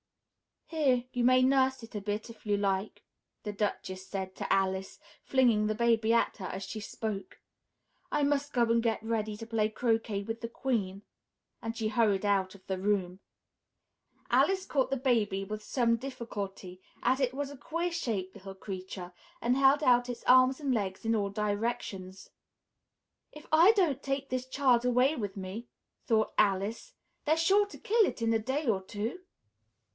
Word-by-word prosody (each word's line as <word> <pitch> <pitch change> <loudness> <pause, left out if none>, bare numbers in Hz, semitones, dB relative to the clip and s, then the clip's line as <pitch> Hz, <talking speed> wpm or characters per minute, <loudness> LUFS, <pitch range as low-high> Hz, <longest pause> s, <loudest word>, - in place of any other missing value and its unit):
"Here! 275 -7 +1
You 245 - -1
may 255 0 +5
nurse 265 -1 +3
it 230 - -11
a 210 - -4
bit, 210 +3 -3
if 230 -2 -13
you 205 -1 +1
like!" 195 0 -1 0.4
the 210 - -3
Duchess 190 -2 -3
said 190 -1 -5
to - - -4
Alice, 190 0 0 0.2
flinging 235 -5 +3
the 215 - 0
baby 230 -1 +2
at 230 - +2
her 190 - -6
as 190 +1 -5
she 205 +3 -6
spoke. 205 -2 -5 0.7
"I 295 - +1
must 285 0 +1
go 240 - +3
and 230 0 +3
get 225 -1 -1
ready 220 -2 -2
to 225 - -7
play 220 -2 0
croquet 225 -3 0
with 225 +2 -5
the 230 - -3
Queen," 210 -7 -2 0.6
and 225 0 -5
she 220 -2 -1
hurried 215 -3 +2
out 195 -1 +1
of 190 - -18
the 190 -1 -3
room. 190 -2 0 1.1
Alice 380 -1 +3
caught 265 -3 0
the 270 - 0
baby 225 -7 +1
with 210 +2 -5
some 230 0 +1
difficulty, 205 -7 -6 0.2
as 255 +2 +2
it 255 -2 +1
was 280 +1 -3
a 285 - -10
queer 335 +5 -2
shaped 215 - -3
little 195 0 -10
creature 185 -2 -7 0.3
and 245 +2 +2
held 275 +2 +5
out 245 -2 +4
its 240 -1 -6
arms 255 +2 +5
and 275 -3 0
legs 195 -3 -2
in 225 - +2
all 200 -2 0
directions. 205 -2 -3 1.0
"If 300 - -12
I 335 +7 +7
don't 330 - +1
take 275 0 -3
this 255 0 -2
child 260 -3 +3
away 250 +4 +3
with 205 -6 -4
me," 195 +5 -6 0.4
thought 220 -1 +2
Alice, 205 - +1 0.3
"they're 315 +1 +3
sure 390 +5 +4
to - - -11
kill 445 0 +3
it - - -4
in 230 0 +2
a 225 - +2
day 265 +7 -2
or 210 -6 +1
two. 210 - -4
225 Hz, 175 wpm, -30 LUFS, 200-260 Hz, 1.1 s, I